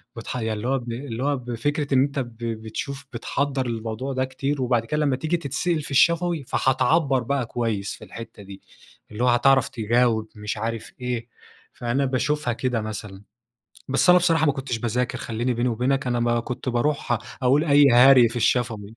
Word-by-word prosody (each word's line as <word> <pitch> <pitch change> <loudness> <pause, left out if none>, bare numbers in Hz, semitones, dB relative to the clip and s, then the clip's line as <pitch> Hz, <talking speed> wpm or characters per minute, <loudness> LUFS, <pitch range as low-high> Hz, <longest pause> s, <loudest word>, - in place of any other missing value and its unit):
بتح 115 +2 -6
يعني 110 -2 -2
اللي 110 +3 -4
هو 135 +1 +2
ب 120 -1 -7
اللي 120 0 -5
هو 145 -1 +1
بفكرة 135 +4 -2
إن 130 - +5
أنت 140 0 -2
ب 120 -3 -6
بتشوف 115 +5 -5
بتحضّر 135 +2 -2
للموضوع 115 +3 -4
ده 130 0 0
كتير 135 +1 -3
وبعد 120 -2 +1
كده 150 +3 0
لمّا 135 -2 +2
تييجي 160 +6 -1
تتسأل 155 +2 -1
في 145 - -9
الشفوي 170 +2 +3
فهتعبّر 135 +1 +2
بقى 135 0 -1
كويس 110 -4 -2
في - - -14
الحتة 115 -3 -10
دي، 95 0 -11 0.5
اللي 110 +4 -3
هو - - +3
هتعرف 135 +2 +4
تجاوب 115 -1 +1
مش 105 0 -5
عارف 115 +1 -4
إيه، 120 -1 -3 0.5
فأنا 125 +3 -1
باشوفها 130 0 0
كده 125 -2 -1
مثلًا. 105 -2 -7 0.7
بس 135 +7 +4
أنا 180 - +7
بصراحة 165 -3 +2
ما 145 - +3
كنتش 130 -4 -4
باذاكر 120 +2 -1
خليني 120 +2 -2
بيني 120 +2 0
وبينك 130 +3 0
أنا 120 -1 0
ما 120 0 +1
كنت 125 +2 -5
باروح 120 -1 0 0.2
أقول 140 +5 +3
أي 145 -2 +6
هري 125 -1 +7
في 115 - -8
الشفوي، 115 -3 0
125 Hz, 185 wpm, -24 LUFS, 115-140 Hz, 0.7 s, أنا